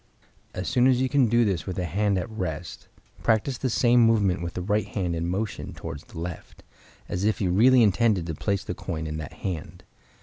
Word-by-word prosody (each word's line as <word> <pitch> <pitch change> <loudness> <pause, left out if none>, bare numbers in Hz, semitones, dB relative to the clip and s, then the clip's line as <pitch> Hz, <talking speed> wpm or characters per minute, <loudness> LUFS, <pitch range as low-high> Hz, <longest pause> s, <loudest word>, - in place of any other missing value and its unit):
As 90 - -4
soon 125 -1 +3
as 130 -2 +4
you 130 - +2
can 135 -2 +3
do 120 +1 +3
this 95 -4 -1
with 95 - -3
the 90 - -2
hand 100 +4 +1
at 90 - -2
rest, 90 -7 -5 0.3
practice 115 +4 +1
the 130 - -1
same 120 +1 +4
movement 100 -6 +3
with 85 0 -5
the 90 - -2
right 105 +2 0
hand 90 -4 -2
in 85 +1 -2
motion 100 +3 -3
towards - - -7
the - - -13
left, 85 +1 -7 0.4
as 90 - -3
if 110 +1 +1
you 95 -4 0
really 120 +6 +6
intended 105 -3 +2
to 80 - -3
place 100 +5 -1
the - - -4
coin 80 -4 -5
in 75 0 -4
that 80 -3 -7
hand. 85 -5 -6
100 Hz, 215 wpm, -26 LUFS, 90-115 Hz, 0.4 s, really